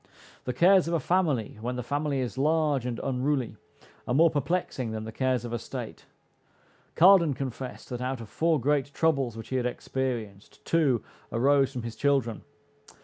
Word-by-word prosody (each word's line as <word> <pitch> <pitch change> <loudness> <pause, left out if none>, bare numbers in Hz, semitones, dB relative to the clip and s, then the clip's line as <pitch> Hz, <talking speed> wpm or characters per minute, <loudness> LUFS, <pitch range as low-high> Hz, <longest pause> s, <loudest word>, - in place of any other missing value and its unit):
The 125 - -1
cares 180 +6 +5
of 170 - 0
a - - +2
family, 150 - 0
when 125 +2 -3
the 125 - -4
family 145 +1 -1
is 125 - -4
large 150 -2 +1
and 120 -2 -3
unruly, 135 -1 -1 0.5
are 125 - 0
more 165 +2 +5
perplexing 145 -4 -1
than 110 0 -4
the 110 - -6
cares 130 0 0
of 120 - -5
a 120 - -1
state. - - -8 0.9
Cardan 170 -5 +6
confessed, 130 -1 -6
that 125 -1 -5
out 130 0 -2
of 115 - -8
four 160 +6 +1
great 140 +2 0
troubles 140 -8 +1
which 115 - -9
he 130 - -1
had 125 -1 0
experienced, 120 -6 -5
two 145 -9 +2 0.3
arose 135 +2 +3
from 125 -4 -5
his 115 -1 -6
children. 135 -3 0
130 Hz, 175 wpm, -27 LUFS, 120-150 Hz, 0.9 s, Cardan